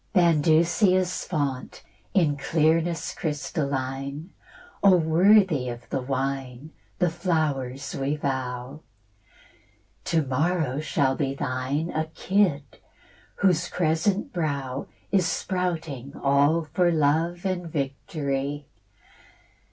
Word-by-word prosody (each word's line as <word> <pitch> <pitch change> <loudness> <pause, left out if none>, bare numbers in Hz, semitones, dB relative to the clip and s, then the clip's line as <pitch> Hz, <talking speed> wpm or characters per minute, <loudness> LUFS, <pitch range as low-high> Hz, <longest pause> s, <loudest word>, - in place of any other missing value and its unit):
Bandusia's 175 +2 +3
fount, 140 -6 -3 0.3
in 160 -7 +3
clearness 160 +2 +1
crystalline, 140 0 -3 0.5
O 195 -2 +7
worthy 170 -3 +4
of 120 0 -8
the 135 - -1
wine, 135 +1 -3 0.3
the 180 -3 +2
flowers 150 -6 -1
we 140 +2 -1
vow! 130 0 -4 1.2
To 165 -2 +2
morrow 145 +1 0
shall 140 -3 +1
be 135 -1 -1
thine 135 +5 -2
A 160 0 -1
kid, 180 -3 +1 0.7
whose 180 -3 +2
crescent 175 +4 0
brow 140 -6 -2 0.2
Is 190 -4 +3
sprouting 165 -7 -3
all 145 +4 +3
for 175 -1 +3
love 165 +4 +1
and 180 -2 -2
victory. 140 -1 -3
155 Hz, 95 wpm, -25 LUFS, 135-170 Hz, 1.2 s, O